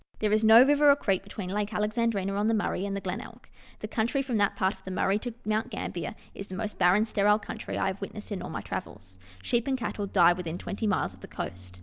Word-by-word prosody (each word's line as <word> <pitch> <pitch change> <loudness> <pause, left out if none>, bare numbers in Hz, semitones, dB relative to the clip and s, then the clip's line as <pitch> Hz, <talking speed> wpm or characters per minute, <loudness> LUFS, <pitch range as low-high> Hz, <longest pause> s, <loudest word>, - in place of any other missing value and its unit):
There 210 -1 0
is 215 +1 +3
no 220 +2 +9
river 290 +1 +5
or 280 - +8
creek 195 -9 0
between 195 -1 -7
Lake 210 +1 -2
Alexandrina 210 -2 0
on 205 +2 +1
the 225 - +3
Murray 200 -2 -1
and 200 - -3
the 200 - -3
Glenelg. 185 0 -6 0.3
The 215 - -4
country 235 +5 0
from 250 -4 -1
that 205 -1 +2
part 190 +1 +1
of - - -21
the - - -7
Murray 195 +2 +1
to 240 0 -6
Mount 215 +3 0
Gambler 180 -5 -4 0.2
is 200 - -8
the 185 - -7
most 215 +1 -4
barren, 190 +5 +5
sterile 210 -1 +3
country 215 - -6
I - - 0
have 190 +1 -2
witnessed 210 +2 -7
in 195 -3 -3
all - - -6
my - - -4
travels. 95 -2 -7 0.2
Sheep 235 - 0
and 265 -1 +1
cattle 210 -3 -3
die 175 -3 +5
within 175 -2 -5
twenty 210 +4 -3
miles 140 - 0
of 95 - -17
the - - -9
coast. 90 0 -7
205 Hz, 250 wpm, -28 LUFS, 185-220 Hz, 0.3 s, no